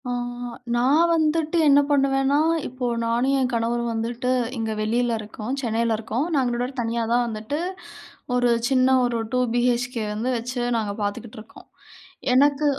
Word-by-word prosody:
ஆ - - -1 0.6
நான் 285 +8 +3
வந்துட்டு 320 +1 +1
என்ன 280 0 +7
பண்ணுவேன்னா, 275 0 +2 0.3
இப்போ 255 0 -5 0.2
நானும் 240 +4 +1
என் 255 -1 0
கணவரும் 235 +1 0
வந்துட்டு 235 +3 -2 0.3
இங்க 225 -1 -2
வெளியில 235 +2 0
இருக்கோம் 215 +5 -5
சென்னைல 230 -2 0
இருக்கோம் 225 +5 -2
நாங்க 245 -1 0
தனியா 230 0 -1
தான் 245 0 +3
வந்துட்டு 220 +6 -4 0.8
ஒரு 245 -1 +2 0.2
சின்ன 255 -1 +3 0.2
ஒரு 240 -1 -1 0.2
2 250 - +2 0.2
BHK 245 +1 +1 0.2
வந்து 225 +4 -2
வச்சு 245 +2 -4 0.2
நாங்க 215 -2 -2
பாத்துக்கிட்டு 205 +3 -5
இருக்கோம். - - -16 0.7
எனக்கு 285 +3 +3
245 Hz, 140 wpm, -23 LUFS, 230-270 Hz, 0.8 s, என்ன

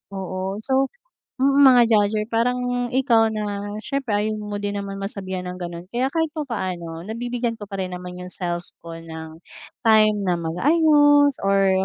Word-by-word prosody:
Oo. 190 +1 -4
So 270 0 +2 0.5
mm, 275 +1 +4
mga 250 -2 +7
judger. 210 +1 +2
Parang 245 +1 0
ikaw 235 -4 +3
na 205 -1 -4
siyempre, 255 -5 -2
ayaw 215 +1 -1
mo 210 -1 -5
din 205 0 -3
naman 195 0 -5
masabihan 190 -2 -4
ng 180 - -5
gano'n 170 -1 -6
kaya 250 +2 0
kahit 320 -2 0
papaano 185 - -4
nabibigyan 240 +1 -3
ko - - -7
pa 195 - -5
rin 185 -1 -3
naman 180 0 -8
yung 180 0 -7
self 175 -2 -3 0.2
ko 165 0 -8
ng 160 -1 -9 0.5
time 215 -1 +5
na 175 - +2
mag-ayos 290 - +4
or 195 -1 +3
210 Hz, 160 wpm, -22 LUFS, 185-245 Hz, 0.5 s, mga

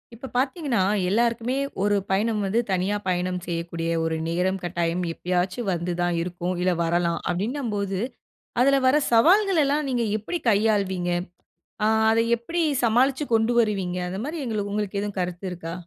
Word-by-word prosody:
இப்ப 260 +3 -9
பார்த்தீங்கன்னா, 265 - 0 0.3
எல்லாருக்குமே 235 +4 +1 0.3
ஒரு 205 0 +3
பயணம் 210 +2 +1
வந்து 200 +4 +1
தனியா 190 +2 0
பயணம் 180 0 0
செய்யக்கூடிய 170 -1 -3
ஒரு 160 0 0
நேரம், 180 +3 0
கட்டாயம் 175 0 -1
எப்பயாச்சு 180 +4 -1
வந்து 175 0 -2
தான் 175 0 +1
இருக்கும். 175 +1 -3
இல்ல 180 0 +2
வரலாம் 170 0 +1
அப்பிடின்னம்போது, 200 -1 -2 0.6
அதுல 275 +2 +5
வர 260 - +5 0.2
சவால்களலாம் 305 - +4
நீங்க 245 -2 0
எப்பிடி 335 - -4
கையாள்வீங்க? 200 -4 +1 0.8
ஆ - - +4 0.2
அத 225 - +3 0.2
எப்பிடி 335 +9 -3 0.2
சமாளிச்சு 255 +5 +3
கொண்டு 225 +1 +3
வருவீங்க. 195 -5 0
அந்த 190 +2 -4
மாரி 310 +3 -4
எங்களுக் 210 -4 -2
உங்களுக்கு 205 -1 -2
எதுவும் 205 -1 -5
கருத்து 180 +1 -3
இருக்கா? 165 -1 -6
200 Hz, 145 wpm, -24 LUFS, 180-235 Hz, 0.8 s, அதுல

